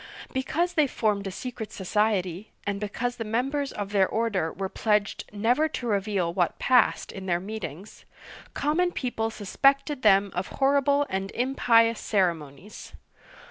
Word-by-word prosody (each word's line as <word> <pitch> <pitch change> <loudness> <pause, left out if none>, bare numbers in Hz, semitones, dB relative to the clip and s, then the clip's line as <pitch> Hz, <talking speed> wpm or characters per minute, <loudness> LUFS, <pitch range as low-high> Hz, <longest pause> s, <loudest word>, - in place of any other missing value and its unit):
'* - - -14
Because 315 +7 -1
they 305 -4 +3
formed 210 -5 -1
a - - -4
secret 220 0 -6
society, 200 -1 -1 0.2
and 200 -1 -2
because 235 +4 -3
the 225 - -3
members 270 +6 -1
of 205 -1 -5
their 195 -2 +3
order 210 -8 -1
were 195 +1 -4
pledged 210 +1 0
never 235 +9 +2
to 260 - -5
reveal 200 -5 0
what 175 -1 0
passed 250 -2 +2
in 190 0 -8
their 175 -1 +1
meetings, 195 -2 -7 0.5
common 345 +5 +1
people 225 -4 -2
suspected 275 +7 +1
them 200 -2 +4
of 180 +1 -3
horrible 280 +1 +2
and 190 +1 -3
impious 230 -3 +3
ceremonies. 175 -2 -2
215 Hz, 145 wpm, -26 LUFS, 195-255 Hz, 0.5 s, them